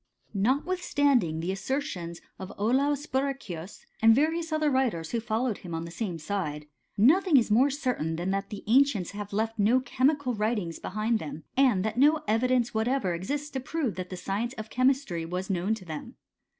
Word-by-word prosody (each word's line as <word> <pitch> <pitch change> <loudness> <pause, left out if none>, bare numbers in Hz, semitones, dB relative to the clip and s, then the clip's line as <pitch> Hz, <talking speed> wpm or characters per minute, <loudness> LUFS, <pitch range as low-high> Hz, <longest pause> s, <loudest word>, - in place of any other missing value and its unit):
Notwithstanding 270 - +1
the 175 +3 -1
assertions 195 - -3 0.2
of 190 0 -7
Olaus 275 +7 +1
Borri 275 0 0
chius, 180 -6 -9 0.2
and 225 0 +7
various 325 +4 +1
other 310 -1 +1
writers 235 -12 0
who 235 - 0
followed 230 0 -1
him 170 -3 -6
on 165 +1 -4
the 170 - -8
same 180 -3 -3
side, 155 -3 -3 0.3
nothing 315 - +5
is 230 -4 +2
more 255 +6 +5
certain 250 - -1
than 175 +3 -2
that 195 +1 -2
the 205 - -7
ancients 235 -5 +3
have 205 0 -7
left 220 +2 -1
no 225 +5 +4
chemical 265 0 +1
writings 210 -6 -1
behind 215 +3 -1
them, 155 -2 -7
and 245 -8 +3
that 220 +2 -2
no 300 +3 +4
evidence 245 +2 +2
whatever 220 -3 0
exists 285 - -3
to 265 - -3
prove 265 -3 -2
that 185 -1 -6
the 185 - -6
science 215 +7 -3
of 220 -2 -8
chemistry 255 -9 +1
was 180 +4 -3
known 190 +4 0
to 200 -4 -11
them. 155 -3 -7
225 Hz, 180 wpm, -28 LUFS, 185-270 Hz, 0.3 s, and